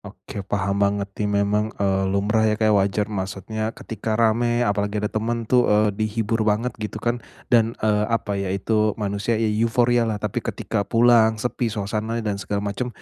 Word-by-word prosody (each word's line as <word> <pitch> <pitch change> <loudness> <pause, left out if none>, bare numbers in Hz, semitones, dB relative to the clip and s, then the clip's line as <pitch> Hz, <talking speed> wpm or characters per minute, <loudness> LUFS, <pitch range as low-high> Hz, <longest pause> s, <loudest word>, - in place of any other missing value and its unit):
Oke. 100 - -9
Paham 100 0 -1
banget 100 0 +1
nih, 105 0 -2
memang, 105 +2 +1
eee, 95 -1 +1
lumrah 105 +3 +2
ya 105 - +1
Kak, 110 -1 +2
wajar 100 +1 +2
maksudnya 100 +3 -3
ketika 110 0 -4
rame 120 +1 +2
apalagi 105 0 0
ada 105 0 -2
teman 115 +2 -1
tuh, 125 +2 +3
eee, 105 0 +4
dihibur 110 +1 -1
banget 110 +4 +1
gitu 105 0 -4
kan, 120 +2 -1 0.3
dan, 115 0 +3
eee, 105 0 +2
apa 115 -3 -1
ya 95 - -2
itu, 105 +2 0
manusia 105 +2 -1
i 115 - 0 0.2
euforialah, 115 -1 +2
tapi 105 -1 -3
ketika 100 - -3
pulang 115 -1 +5
sepi 120 +1 -2
suasananya 110 +2 -3
dan 100 - -5
segala 100 0 -3
macam 125 +5 -3
110 Hz, 175 wpm, -23 LUFS, 100-115 Hz, 0.3 s, pulang